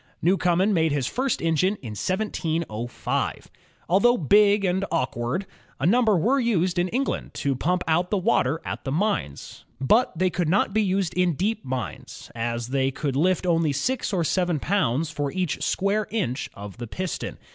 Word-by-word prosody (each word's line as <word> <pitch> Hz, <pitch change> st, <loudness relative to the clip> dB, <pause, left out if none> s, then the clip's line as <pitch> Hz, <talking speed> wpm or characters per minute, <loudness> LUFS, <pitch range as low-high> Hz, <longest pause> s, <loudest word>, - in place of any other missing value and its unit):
Newcomen 185 Hz, +3 st, +2 dB
made 160 Hz, -3 st, +2 dB
his 140 Hz, -3 st, 0 dB
first 260 Hz, -, -1 dB
engine 165 Hz, +5 st, +2 dB
in 120 Hz, -, -9 dB
1705. 160 Hz, -, -2 dB, 0.4 s
Although 220 Hz, +8 st, +4 dB
big 205 Hz, +5 st, +4 dB
and 185 Hz, +1 st, +1 dB
awkward, 150 Hz, +2 st, -1 dB, 0.3 s
a 135 Hz, -, -1 dB
number 220 Hz, +1 st, +4 dB
were 245 Hz, -, +2 dB
used 185 Hz, -7 st, +1 dB
in 175 Hz, -, +2 dB
England 260 Hz, +8 st, -2 dB
to 140 Hz, -2 st, -1 dB
pump 180 Hz, +7 st, 0 dB
out 175 Hz, +3 st, +2 dB
the 205 Hz, -, +1 dB
water 160 Hz, -5 st, +1 dB
at -, -, -5 dB
the 135 Hz, -, -3 dB
mines. 165 Hz, -, -2 dB, 0.2 s
But 200 Hz, -, +2 dB
they 185 Hz, +1 st, +2 dB
could 175 Hz, -3 st, -1 dB
not 195 Hz, +5 st, +2 dB
be 220 Hz, -, +3 dB
used 190 Hz, -3 st, 0 dB
in 180 Hz, -3 st, +1 dB
deep 215 Hz, +6 st, -1 dB
mines, 130 Hz, -2 st, -6 dB
as 120 Hz, 0 st, -3 dB
they 135 Hz, 0 st, +1 dB
could 135 Hz, 0 st, -3 dB
lift 180 Hz, +5 st, +2 dB
only 165 Hz, -4 st, +2 dB
six 240 Hz, -, -1 dB
or 180 Hz, -4 st, +1 dB
seven 175 Hz, -1 st, 0 dB
pounds 155 Hz, -4 st, 0 dB
for 145 Hz, -2 st, -2 dB
each 185 Hz, -4 st, -2 dB
square 200 Hz, +2 st, 0 dB
inch 135 Hz, -, -2 dB
of 100 Hz, 0 st, -9 dB
the 120 Hz, -1 st, -6 dB
piston. 185 Hz, +9 st, -4 dB
175 Hz, 170 wpm, -25 LUFS, 140-200 Hz, 0.4 s, Although